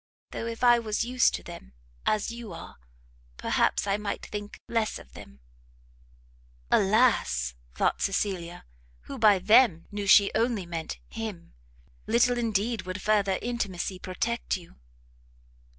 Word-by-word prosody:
though 230 Hz, -, -4 dB
if 230 Hz, +1 st, -6 dB
I 240 Hz, -1 st, +6 dB
was 215 Hz, -2 st, -1 dB
used 250 Hz, 0 st, +2 dB
to -, -, -7 dB
them, 65 Hz, +1 st, -11 dB, 0.3 s
as 215 Hz, +1 st, +1 dB
you 235 Hz, -5 st, -8 dB
are, -, -, -10 dB, 0.6 s
perhaps -, -, +1 dB
I 200 Hz, 0 st, +1 dB
might 210 Hz, -1 st, -4 dB
think 205 Hz, 0 st, -7 dB
less 225 Hz, -2 st, -1 dB
of 60 Hz, -, -15 dB
them." 65 Hz, +1 st, -13 dB, 1.3 s
Alas! 195 Hz, -, +3 dB, 0.2 s
thought -, -, 0 dB
Cecilia, 180 Hz, -3 st, -2 dB, 0.4 s
who -, -, -8 dB
by 210 Hz, -3 st, +6 dB
them 195 Hz, -2 st, +4 dB
knew 205 Hz, -1 st, -4 dB
she 200 Hz, 0 st, +7 dB
only 225 Hz, -4 st, 0 dB
meant 165 Hz, -2 st, -5 dB
him, 215 Hz, -7 st, -7 dB, 0.5 s
little 240 Hz, +2 st, +3 dB
indeed 225 Hz, 0 st, 0 dB
would 185 Hz, +2 st, -6 dB
further 200 Hz, -2 st, +2 dB
intimacy 200 Hz, -6 st, -3 dB
protect 210 Hz, +7 st, -2 dB
you! 175 Hz, -2 st, -16 dB
205 Hz, 135 wpm, -27 LUFS, 185-230 Hz, 1.3 s, she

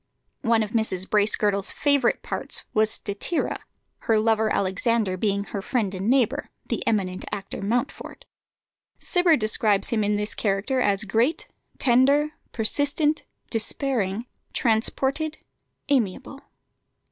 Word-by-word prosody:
One 230 Hz, -1 st, +3 dB
of 210 Hz, -, -6 dB
Mrs. 195 Hz, -5 st, 0 dB
Bracegirdle's 205 Hz, -1 st, +1 dB
favourite 285 Hz, -4 st, +1 dB
parts -, -, -1 dB
was 215 Hz, 0 st, +3 dB
Statira, 215 Hz, -, -1 dB, 0.4 s
her 220 Hz, -1 st, +2 dB
lover 220 Hz, -1 st, +2 dB
Alexander 200 Hz, +1 st, +1 dB
being 200 Hz, +1 st, 0 dB
her 200 Hz, +1 st, -5 dB
friend 210 Hz, -3 st, -1 dB
and 190 Hz, +3 st, -2 dB
neighbour, 255 Hz, -4 st, +1 dB, 0.2 s
the -, -, -3 dB
eminent 190 Hz, -4 st, 0 dB
actor 200 Hz, -1 st, -5 dB
Mountfort. 240 Hz, +7 st, -3 dB, 0.7 s
Cibber 355 Hz, -3 st, +3 dB
describes 215 Hz, -2 st, +2 dB
him 220 Hz, -2 st, +1 dB
in 205 Hz, 0 st, +1 dB
this 210 Hz, +1 st, -2 dB
character 210 Hz, +6 st, 0 dB
as 200 Hz, -2 st, +1 dB
"great, 230 Hz, -, +1 dB, 0.3 s
tender, 275 Hz, +4 st, +3 dB, 0.2 s
persistent, 290 Hz, +7 st, +1 dB, 0.3 s
despairing, 225 Hz, -2 st, 0 dB, 0.3 s
transported, 270 Hz, +7 st, 0 dB, 0.5 s
amiable." 275 Hz, +1 st, -1 dB
220 Hz, 115 wpm, -24 LUFS, 200-260 Hz, 0.7 s, One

